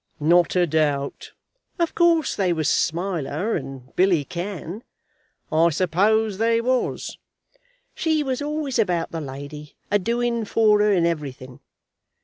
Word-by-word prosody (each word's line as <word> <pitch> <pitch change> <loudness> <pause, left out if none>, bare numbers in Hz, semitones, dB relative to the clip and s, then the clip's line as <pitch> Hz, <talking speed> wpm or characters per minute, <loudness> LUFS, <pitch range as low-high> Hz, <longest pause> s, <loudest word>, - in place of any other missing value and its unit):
"Not 170 +4 +3
a 180 -1 +4
doubt." 145 -3 -1 0.4
"Of 340 -2 0
course 335 -3 +3
they 185 -3 +1
was 160 -2 -1
Smiler 175 +2 -1
and 135 -4 -7
Billy 180 -5 +3
Cann." 185 - -6 0.7
"I 165 +2 +4
suppose 195 +6 +1
they 230 0 +3
was." 250 +2 -1 0.7
"She 315 -2 0
was 265 -1 -2
always 295 -3 -2
about 180 -6 0
the 165 - -4
lady, 145 +2 -8 0.2
a 205 - +4
doing 235 +2 -1
for 215 0 +3
her 210 0 +3
in 175 -4 +3
everything. 135 -6 -4
185 Hz, 130 wpm, -23 LUFS, 155-230 Hz, 0.7 s, a